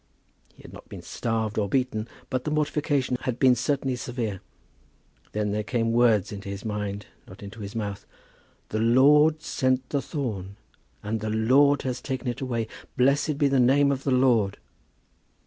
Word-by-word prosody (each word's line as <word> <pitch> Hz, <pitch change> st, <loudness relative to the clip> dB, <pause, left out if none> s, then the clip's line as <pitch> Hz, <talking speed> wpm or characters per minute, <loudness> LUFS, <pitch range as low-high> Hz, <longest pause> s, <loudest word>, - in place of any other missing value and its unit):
He -, -, -18 dB
had -, -, -12 dB
not -, -, -13 dB
been -, -, -9 dB
starved 110 Hz, -2 st, -2 dB
or 100 Hz, -2 st, -1 dB
beaten, 120 Hz, -3 st, -1 dB, 0.2 s
but 130 Hz, -2 st, -1 dB
the -, -, -2 dB
mortification 150 Hz, -3 st, 0 dB
had 125 Hz, -2 st, -2 dB
been 130 Hz, -1 st, +5 dB
certainly 135 Hz, +1 st, -1 dB
severe. 120 Hz, -6 st, -4 dB, 0.9 s
Then 105 Hz, -1 st, -1 dB
there 105 Hz, +1 st, -1 dB
came 115 Hz, +1 st, 0 dB
words 115 Hz, -4 st, +3 dB
into 100 Hz, -1 st, -7 dB
his 100 Hz, +1 st, -6 dB
mind, 105 Hz, -1 st, -3 dB, 0.2 s
not 95 Hz, +2 st, -12 dB
into 100 Hz, +3 st, -9 dB
his 100 Hz, 0 st, -7 dB
mouth 100 Hz, -3 st, -4 dB, 0.6 s
"The 110 Hz, -, -2 dB
Lord 150 Hz, +7 st, +5 dB
sent 130 Hz, -3 st, 0 dB
the 140 Hz, -, 0 dB
thorn, 105 Hz, -, -4 dB, 0.5 s
and 110 Hz, +2 st, -2 dB
the 110 Hz, +1 st, -3 dB
Lord 135 Hz, +6 st, +3 dB
has 125 Hz, -1 st, -3 dB
taken 130 Hz, 0 st, -4 dB
it 120 Hz, -, -5 dB
away. 120 Hz, -4 st, -2 dB, 0.3 s
Blessed 140 Hz, +3 st, +2 dB
be 145 Hz, -1 st, +3 dB
the 135 Hz, -1 st, +2 dB
name 140 Hz, +3 st, +4 dB
of 135 Hz, -1 st, -3 dB
the -, -, -1 dB
Lord." 120 Hz, -6 st, +3 dB
125 Hz, 170 wpm, -26 LUFS, 105-135 Hz, 0.9 s, been